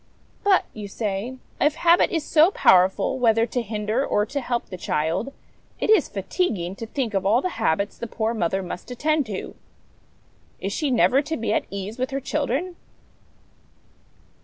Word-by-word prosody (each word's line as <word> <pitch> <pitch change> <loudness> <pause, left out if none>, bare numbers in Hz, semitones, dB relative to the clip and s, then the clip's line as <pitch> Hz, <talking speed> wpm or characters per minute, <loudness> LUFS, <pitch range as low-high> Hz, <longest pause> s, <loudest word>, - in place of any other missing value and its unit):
' - - -35
But/ 400 -2 +4
you 210 -2 -7
say, 205 +3 -3
c - - -12 0.3
if 300 - -1
habit 345 0 +4
is 325 -3 -1
so 320 +2 +5
powerful, 190 - +3
whether 230 -2 +4
to 245 +1 -2
hinder 215 +3 -1
or 210 -6 +1
to 280 +5 -3
help 240 -1 -2
the 190 - -8
child, 170 - -1 0.5
it - - +1
is 435 - +4
fatiguing 195 - -2
to 225 - -6
think 240 -2 -3
of 195 -1 0
all 210 +5 +4
the 360 +1 -4
habits 200 +1 0
the 235 - -4
poor 225 +1 -1
mother 190 -2 -1
must 180 +4 -7
attend 295 +2 0
to. 200 -3 -5 1.1
Is 195 +1 -3
she 300 +4 -1
never 255 +2 +4
to 320 +2 -4
be 220 -2 -1
at - - 0
ease 200 +4 -6
with 255 - -1
her 275 - -2
children 300 +6 -2
230 Hz, 180 wpm, -24 LUFS, 200-280 Hz, 1.1 s, so